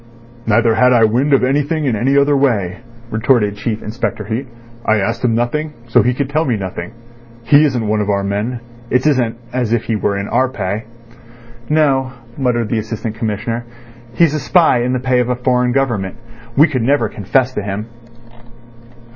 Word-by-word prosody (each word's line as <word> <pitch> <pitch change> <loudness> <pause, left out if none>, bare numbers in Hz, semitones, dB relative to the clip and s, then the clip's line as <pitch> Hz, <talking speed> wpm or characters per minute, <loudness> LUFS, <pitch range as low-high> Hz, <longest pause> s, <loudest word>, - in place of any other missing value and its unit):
"Neither 115 +1 +3
had 125 +3 +4
I 115 -2 +4
wind 125 +7 +2
of 135 - +4
anything 145 +4 0
in 125 -5 +1
any 135 +6 +1
other 140 +1 +4
way," 105 -10 0 0.3
retorted 110 -2 +2
Chief 110 +1 -4
Inspector 110 0 -3
Heat. 115 +6 -3 0.4
"I 110 - +2
asked 115 +5 -2
him 115 -2 +2
nothing, 150 +6 -1 0.2
so - - +5
he 125 0 +1
could 140 0 -1
tell 155 +3 0
me 125 -7 0
nothing. 95 +1 -6 0.5
He 145 +6 +5
isn't 125 -6 -1
one 105 0 +1
of 105 - -2
our 100 -1 +1
men. 105 +5 -2 0.3
It 125 +2 +1
isn't 125 -6 +1 0.2
as 125 -3 -1
if 120 - +1
he 115 - -1
were 100 -1 -1
in 100 +1 -3
our 130 0 +1
pay." 105 -2 -4 0.8
"No," 135 -4 +2 0.2
muttered 120 -4 0
the 115 - 0
Assistant 110 0 -4
Commissioner. 115 +1 -3 0.5
"He's 165 -3 +3
a 155 - -1
spy 155 -4 +3
in 125 +1 0
the 130 - 0
pay 130 0 +1
of 125 0 0
a 125 - +1
foreign 125 0 +1
government. 120 -7 -1 0.4
We 155 +4 +7
could 135 -5 -2
never 125 -1 +2
confess 125 +6 0
to - - -2
him." 100 +1 -4
120 Hz, 190 wpm, -17 LUFS, 110-135 Hz, 0.8 s, We